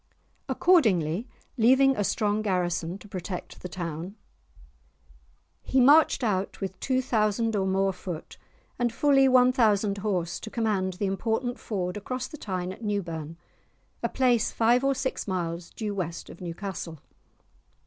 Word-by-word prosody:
Accordingly, 215 - +3 0.3
leaving 265 +4 +5
a 205 - 0
strong 210 +1 0
garrison 180 -3 -1
to 205 - -14
protect 185 -2 -6
the 180 - -6
town, 170 +2 -5 1.5
he 265 - +1
marched 285 +1 +6
out 195 -4 -1
with 190 -1 -5
two 260 -1 0
thousand 225 -1 +1
or 190 -1 +1
more 195 0 +1
foot 180 -3 -7 0.4
and 240 -1 +1
fully 270 +2 +4
one 255 -1 +6
thousand 210 -5 +2
horse 180 -5 -1
to 220 - -8
command 210 -5 0
the 200 +3 -3
important 225 +6 -1
ford 180 -3 -3
across 250 +4 -4
the 315 - -10
Tyne 185 -6 -4
at 230 - -13
Newburn, 165 -6 -3 0.6
a - - 0
place 245 -3 +2
five 240 +3 +3
or 275 0 +2
six 260 -3 -3
miles 170 -2 -3
due 210 -2 -4
west 170 -4 -4
of 170 - -13
Newcastle. 175 -1 -5
205 Hz, 145 wpm, -27 LUFS, 180-240 Hz, 1.5 s, marched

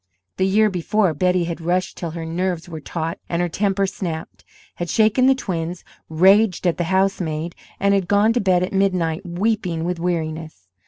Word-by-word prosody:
The 190 - +2
year 210 +2 +3
before, 185 +1 +1
Betty 180 +3 +1
had 170 0 -4
rushed 180 +3 -1
till 170 - -4
her 165 - -4
nerves 175 0 -2
were 160 -2 -7
taut 165 +3 -4
and 170 - -1
her 175 - +1
temper 195 +3 0
snapped, 170 -4 -5 0.3
had 175 0 -4
shaken 220 +6 +3
the 270 - +5
twins, 175 -7 -4 0.3
raged 190 +4 +4
at 175 - +2
the 175 - -1
housemaid, 175 -3 0 0.3
and 200 0 +3
had 195 -3 +1
gone 205 +3 +3
to 245 - +1
bed 185 -2 +3
at 185 - -3
midnight 185 -3 +1
weeping 180 -2 -1
with 175 0 -2
weariness. 160 - -3
180 Hz, 180 wpm, -21 LUFS, 165-195 Hz, 0.3 s, the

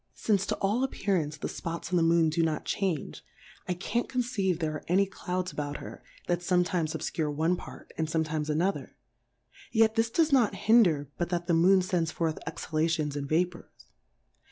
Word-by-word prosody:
Since 200 -3 +1
to - - 0
all 210 +6 0
appearance 180 - -1
the - - -4
Spots 170 +1 -5
in - - +1
the - - +3
Moon 165 -1 +4
do 165 +2 +1
not 160 -2 -1
change, 185 -7 -2 0.4
I 180 - -1
can't 235 +7 -2
conceive 235 -8 0
there 160 -2 -2
are 155 - -6
any 190 +3 +3
Clouds 185 -1 -4
about 145 -1 -4
her, - - -9 0.2
that 175 -1 0
fometimes 175 -2 0
obfcure 155 0 -2
one 160 +4 +1
part, - - -11
and 160 - +1
fometimes 155 -1 -1
another; 175 +6 -1 0.8
yet 220 -1 +4
this 225 0 +1
does 315 +4 +2
not 230 -7 +4
hinder, 190 - +3
but 175 - -1
that 175 -1 -1
the 170 - +1
Moon 185 +3 +5
fends 180 -3 0
forth 165 -1 -2
Exhalations, 155 -2 -1
and 140 -1 -4
Vapours. 175 +2 0
175 Hz, 180 wpm, -29 LUFS, 160-195 Hz, 0.8 s, Moon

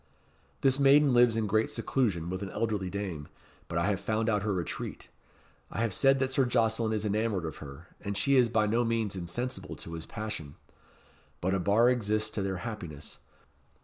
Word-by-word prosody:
"This 135 0 +3
maiden 140 0 +6
lives 120 -2 +5
in 110 -1 0
great 110 +2 +1
seclusion 90 -10 -1
with 95 +1 -3
an 100 - -4
elderly 105 -3 -2
dame, 90 -7 -4 0.4
but 85 - -3
I 85 - +2
have 100 -1 +1
found 110 +3 0
out 105 -2 +1
her 105 +1 -1
retreat. 90 -3 -4 0.6
I - - -3
have 115 -4 0
said 135 +7 +4
that 130 0 0
Sir 135 - +3
Jocelyn 115 -2 +1
is 110 -1 -1
enamoured 105 -3 0
of 80 - -5
her, 75 +3 -10 0.2
and 100 -1 -3
she 140 +5 +3
is 125 -3 +5
by 110 -1 +2
no 115 +3 +2
means 115 -4 -1
insensible 95 +8 -4
to 85 - -9
his 80 -1 -6
passion. 105 -10 -6 0.8
But 95 +2 0
a 95 - +1
bar 105 +6 +4
exists 110 -2 0
to 105 - -3
their 95 -1 -2
happiness. 85 -11 -7
110 Hz, 190 wpm, -29 LUFS, 95-115 Hz, 0.8 s, maiden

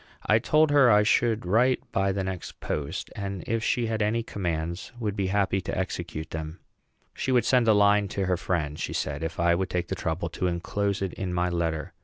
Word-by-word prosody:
I 110 - +4
told 155 +5 +3
her 140 -3 +6
I 105 -1 +6
should 110 0 +2
write 120 +7 +3
by 95 0 +1
the 95 0 -2
next 95 -2 -6
post, 70 -2 -4
and, 100 -3 -4
if 115 -1 -1
she 120 +1 +1
had 110 -1 -2
any 110 +3 +1
commands, 85 -4 -3
would 105 -4 -2
be 100 -2 -1
happy 95 0 +1
to 95 +2 -4
execute 85 -4 -4
them. 80 +1 -5 0.6
She 130 - -2
would 120 -3 +3
send 125 -3 +3
a 110 - +6
line 100 0 +4
to 100 0 -2
her 90 0 +1
friend, 75 -4 -2
she - - -3
said, 70 +2 -2
if 80 0 -4
I 85 0 +4
would 95 +2 -1
take 90 -1 -2
the - - -1
trouble 80 +3 -2
to 90 - -2
enclose 100 +3 -1
it 95 - -3
in 90 -2 -4
my 90 0 +1
letter. 80 -3 -2
95 Hz, 220 wpm, -27 LUFS, 85-105 Hz, 0.6 s, her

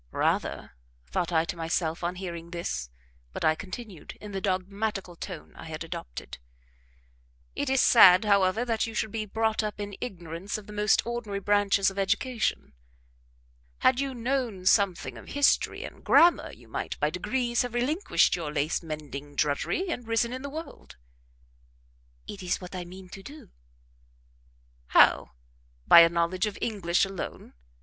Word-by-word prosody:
"Rather," - - -1 0.3
thought 165 - -2
I 160 -1 +2
to 170 - -4
myself 165 0 -2
on 175 +1 -1
hearing 170 -2 -6
this, 70 - -4 0.4
but - - -3
I 155 - +5
continued, 190 0 -9
in 210 - -9
the 195 -1 -4
dogmatical 195 0 -2
tone 175 -1 -8
I - - -10
had 160 0 -6
adopted: - - -7 1.2
"It 285 - -2
is 265 -1 +3
sad, 195 -3 +7
however, 200 +2 +3
that 225 -2 0
you 225 - -7
should 220 - -1
be 215 -1 -3
brought 220 +1 0
up 210 -1 -4
in 205 -1 -5
ignorance 175 -4 -5
of 215 - -10
the 210 - -10
most 210 0 +2
ordinary 235 -4 -4
branches 200 -1 +2
of 195 - -6
education; 220 - -1 1.1
had 255 0 +4
you 275 -1 -2
known 240 -6 -2
something 195 -2 +2
of - - -14
history 285 0 +2
and - - -10
grammar 345 +1 +5
you - - -16
might, - - -5
by - - +1
degrees, 240 -2 0
have 245 -1 -4
relinquished 300 - +2
your 160 -4 -4
lace 150 +1 0
mending 145 -3 -7
drudgery, 150 - 0
and 245 -8 -4
risen 230 +1 +1
in 260 - -5
the 280 - -5
world." 280 - -9 1.3
"It 200 - -8
is 180 -1 -1
what 180 0 -10
I 180 -1 -5
mean 185 +1 -11
to 195 - -10
do." 275 - -12 1.4
"How? - - +5 0.5
By - - +10
a 165 0 +8
knowledge 170 +4 0
of 205 - -5
English 195 -6 +1
alone? 195 -2 -7
195 Hz, 160 wpm, -27 LUFS, 170-230 Hz, 1.4 s, By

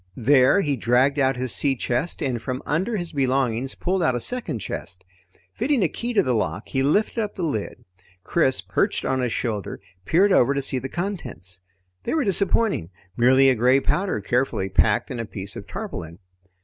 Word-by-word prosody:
There 130 - +4
he 145 -6 0
dragged 130 +4 +2
out 135 -1 +2
his 130 -1 -2
sea 140 -2 +1
chest, 125 +7 -2
and 125 -5 -2
from 130 +2 -4
under 185 +10 -1
his 175 -3 -4
belongings 130 -3 0
pulled 185 +1 -1
out 130 -7 +2
a - - -1
second 245 - -1
chest. 95 -3 -6 0.5
Fitting 265 -3 +1
a - - +3
key 240 +8 -4
to 215 - +3
the 130 - 0
lock, 105 -3 -2
he 135 - 0
lifted 205 - +1
up 210 -2 -3
the 185 - -4
lid. 115 -11 -4 0.4
Chris, 135 -6 +2
perched - - -1
on 130 -1 0
his 125 -2 -1
shoulder, 105 -7 -3 0.3
peered 195 +5 +3
over 140 -4 +4
to 140 - 0
see 130 -1 -1
the 130 +2 -6
contents. 170 - -5 0.4
They - - -2
were 310 - +2
disappointing 200 - +1 0.3
merely 130 +3 +5
a 130 - +5
gray 125 +3 +3
powder 180 - -1
carefully 120 -3 -1
packed 105 +2 +2
in 125 - -4
a 115 - -3
piece 100 -1 -7
of 100 - -8
tarpaulin. 90 - -6
130 Hz, 190 wpm, -23 LUFS, 120-175 Hz, 0.5 s, merely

